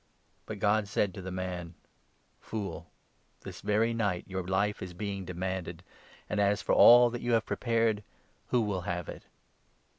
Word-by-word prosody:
But 110 Hz, -, -5 dB
God 105 Hz, 0 st, +2 dB
said 100 Hz, -1 st, 0 dB
to 95 Hz, -, -8 dB
the 95 Hz, -, -6 dB
man 90 Hz, -2 st, -5 dB, 0.3 s
' -, -, -41 dB
Fool! 90 Hz, -7 st, -5 dB, 0.5 s
This -, -, -9 dB
very 110 Hz, +3 st, +1 dB
night 100 Hz, -6 st, -1 dB
your 95 Hz, -1 st, -3 dB
life 95 Hz, +3 st, 0 dB
is 90 Hz, -1 st, -7 dB
being 100 Hz, 0 st, -4 dB
demanded; 90 Hz, -1 st, -4 dB, 0.4 s
and 105 Hz, -, -2 dB
as 100 Hz, 0 st, +2 dB
for -, -, 0 dB
all 120 Hz, 0 st, +8 dB
that 120 Hz, -, -5 dB
you 120 Hz, 0 st, 0 dB
have 110 Hz, -1 st, +2 dB
prepared 115 Hz, -3 st, 0 dB, 0.2 s
— -, -, -38 dB
who 125 Hz, -, +2 dB
will 100 Hz, -4 st, -1 dB
have 85 Hz, -1 st, -4 dB
it -, -, -8 dB
100 Hz, 175 wpm, -30 LUFS, 90-110 Hz, 0.5 s, all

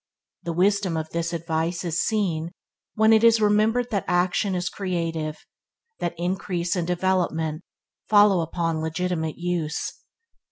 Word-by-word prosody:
The 170 Hz, -2 st, -4 dB
wisdom 190 Hz, -1 st, +2 dB
of 160 Hz, 0 st, -4 dB
this 170 Hz, 0 st, -2 dB
advice 165 Hz, +1 st, -2 dB
is 170 Hz, +1 st, 0 dB
seen 175 Hz, -7 st, 0 dB, 0.5 s
when 220 Hz, +1 st, +5 dB
it 220 Hz, 0 st, +4 dB
is 230 Hz, -1 st, +6 dB
remembered 215 Hz, +3 st, +2 dB
that 200 Hz, -4 st, 0 dB
action 180 Hz, +2 st, +1 dB
is 180 Hz, 0 st, -1 dB
creative, 165 Hz, -6 st, -3 dB, 0.5 s
that 170 Hz, 0 st, -2 dB
increase 175 Hz, -1 st, -2 dB
and 175 Hz, -2 st, -1 dB
development 175 Hz, -3 st, 0 dB, 0.5 s
follow 205 Hz, -3 st, +6 dB
upon 165 Hz, -1 st, -2 dB
legitimate 160 Hz, 0 st, -2 dB
use. 175 Hz, -3 st, -2 dB
175 Hz, 130 wpm, -24 LUFS, 165-195 Hz, 0.5 s, is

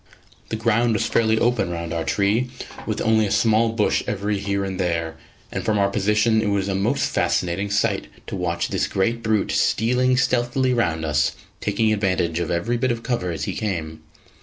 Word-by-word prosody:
The -, -, -2 dB
ground 115 Hz, +1 st, +2 dB
was 110 Hz, -, 0 dB
fairly 110 Hz, -1 st, +2 dB
open 115 Hz, -6 st, +1 dB
round 85 Hz, -1 st, -4 dB
our 85 Hz, -1 st, -1 dB
tree, 105 Hz, +8 st, +1 dB, 0.4 s
with -, -, -2 dB
only 110 Hz, -1 st, +3 dB
a -, -, -4 dB
small 115 Hz, 0 st, +3 dB
bush 110 Hz, -2 st, +1 dB
every 105 Hz, 0 st, -1 dB
here 100 Hz, 0 st, -1 dB
and 95 Hz, -1 st, -5 dB
there; 85 Hz, -3 st, -1 dB, 0.4 s
and -, -, -3 dB
from 110 Hz, -1 st, +1 dB
our 100 Hz, 0 st, +2 dB
position 105 Hz, +2 st, +2 dB
it 105 Hz, -, -1 dB
was 100 Hz, -1 st, 0 dB
a 100 Hz, -, -1 dB
most 95 Hz, +1 st, +1 dB
fascinating 90 Hz, +3 st, 0 dB
sight 100 Hz, 0 st, 0 dB, 0.2 s
to -, -, -5 dB
watch -, -, -1 dB
this -, -, 0 dB
great 115 Hz, +5 st, 0 dB
brute 110 Hz, -2 st, 0 dB
stealing 125 Hz, +3 st, +2 dB
stealthily 125 Hz, 0 st, +1 dB
round 85 Hz, -10 st, 0 dB
us, 75 Hz, +2 st, +1 dB, 0.3 s
taking 110 Hz, +1 st, +1 dB
advantage 90 Hz, -5 st, 0 dB
of 85 Hz, -, -2 dB
every 95 Hz, +8 st, 0 dB
bit 130 Hz, +1 st, +1 dB
of 115 Hz, -1 st, -4 dB
cover 115 Hz, -8 st, -1 dB
as 80 Hz, -3 st, -3 dB
he -, -, -2 dB
came. 80 Hz, -7 st, -3 dB
105 Hz, 190 wpm, -22 LUFS, 90-115 Hz, 0.4 s, only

